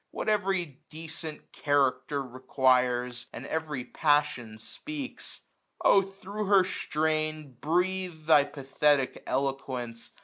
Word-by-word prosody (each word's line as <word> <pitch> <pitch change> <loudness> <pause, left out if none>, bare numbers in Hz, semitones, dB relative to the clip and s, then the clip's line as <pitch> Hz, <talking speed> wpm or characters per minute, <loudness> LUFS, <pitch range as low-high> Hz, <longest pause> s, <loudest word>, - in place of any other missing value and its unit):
What - - -3
every 190 -8 0
decent 160 -1 -7
character 140 -1 +1
requires. 125 -1 +1
And 120 - -8
every 150 -5 -3
passion 145 -7 +1
speaks: 280 - -7 0.4
O 195 - +6
thro* 195 +2 -6
her 195 -1 +6
strain 155 -4 -1
Breathe 180 0 0
thy 150 -3 +6
pathetic 145 -1 +1
eloquence 130 -4 -3
150 Hz, 100 wpm, -29 LUFS, 130-175 Hz, 0.4 s, O